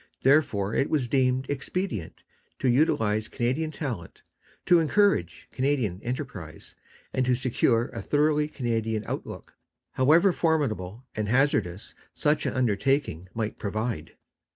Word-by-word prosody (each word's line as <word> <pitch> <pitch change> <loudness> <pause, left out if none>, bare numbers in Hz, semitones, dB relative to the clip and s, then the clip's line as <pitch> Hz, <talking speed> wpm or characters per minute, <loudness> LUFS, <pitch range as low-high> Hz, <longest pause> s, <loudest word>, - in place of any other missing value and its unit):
Therefore 120 -8 +3
it 135 - +1
was 140 -6 +1
deemed 130 0 +1
expedient 145 - -3 0.3
to 135 - -1
utilize 110 -5 +2
Canadian 130 +8 -1
talent, 125 - -6 0.4
to 175 -1 +6
encourage 165 - +1
Canadian 130 -9 -1
enterprise, 115 - -6 0.4
and 130 - +1
to 125 0 +2
secure 120 -1 +1
a - - -6
thoroughly 150 0 +2
Canadian 115 -6 -2
outlook, - - -6 0.4
however 160 +9 +4
formidable 130 - -1
and 105 -1 -2
hazardous 115 -8 +1 0.2
such 150 0 +1
an - - -2
undertaking 120 - 0
might 110 -2 -3
prove. 110 -5 -3
125 Hz, 120 wpm, -26 LUFS, 110-145 Hz, 0.4 s, to